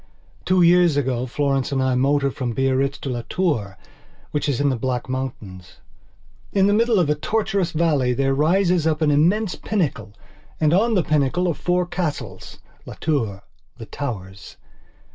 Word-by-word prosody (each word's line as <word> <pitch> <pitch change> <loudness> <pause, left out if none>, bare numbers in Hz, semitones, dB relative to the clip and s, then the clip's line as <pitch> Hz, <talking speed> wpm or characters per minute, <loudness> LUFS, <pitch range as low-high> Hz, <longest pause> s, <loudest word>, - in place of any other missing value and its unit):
Two 185 -1 +3
years 175 -3 +4
ago 130 -2 -1
Florence 135 +1 -1
and 135 - 0
I 130 0 +1
motored 140 +2 +1
from 125 -4 -3
Biarritz 135 +1 0
to 140 - -4
Las 120 -1 -4
Tours, 130 - -1 0.6
which 145 0 -1
is 135 - -1
in 145 0 +2
the 130 - 0
Black 125 0 -3
Mountains. 115 -9 -6 0.7
In 195 -1 +3
the 205 - +3
middle 230 +1 +3
of 175 -5 +3
a 150 - +2
tortuous 200 +3 -1
valley 150 -6 +1
there 135 +2 +1
rises 170 +3 +2
up 155 0 0
an 150 - +3
immense 180 +8 +2
pinnacle 135 - -3 0.5
and 155 0 +2
on 220 +5 +3
the 180 - +2
pinnacle 150 +5 +1
are - - +1
four 180 +3 0
castlesLas 150 - -5 0.4
Tours, 115 -11 -1 0.4
the 115 - -8
Towers. 100 -9 -7
145 Hz, 160 wpm, -22 LUFS, 130-175 Hz, 0.7 s, years